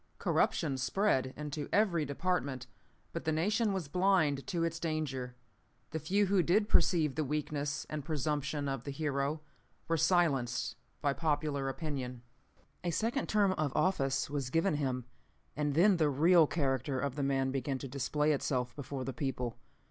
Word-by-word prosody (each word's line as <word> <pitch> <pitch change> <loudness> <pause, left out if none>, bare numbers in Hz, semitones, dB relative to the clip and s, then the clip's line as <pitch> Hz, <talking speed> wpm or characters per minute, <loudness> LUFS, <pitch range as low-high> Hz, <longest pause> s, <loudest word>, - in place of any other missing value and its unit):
"Corruption 140 -7 +1
spread 130 -3 +1
into 150 0 -4
every 185 -7 +2
department, 140 -3 -1 0.5
but - - -4
the 160 - 0
nation 205 +7 +1
was 190 -6 -2
blind 160 -4 +2
to 170 -3 -1
its 165 0 -1
danger. 145 -6 -3 0.6
The 160 - -2
few 195 +7 +2
who 195 -1 +3
did 205 +5 +2
perceive 160 -9 +3
the 155 - -1
weakness 145 0 -2
and 155 -1 -4
presumption 145 -1 -1
of 135 -3 -3
the - - -6
hero 140 +1 -1 0.5
were 165 0 +1
silenced 150 -7 +2 0.3
by 140 -1 +2
popular 145 -3 -1
opinion. 130 -5 -4 0.6
"A 175 - 0
second 230 - -1
term 205 -3 +3
of 155 -6 -1
office 135 -8 +1
was 140 -3 -3
given 165 +2 +2
him, 130 -4 -2 0.5
and 145 -1 -1
then 185 +3 +5
the 155 -3 +3
real 160 +3 +5
character 135 -3 0
of 140 -1 -1
the 145 - -3
man 135 -1 +1
began 135 0 -2
to 135 - -6
display 140 +3 0
itself 125 -4 -1
before 135 -2 -5
the 135 - -3
people. 125 -5 -3
150 Hz, 160 wpm, -32 LUFS, 135-165 Hz, 0.6 s, then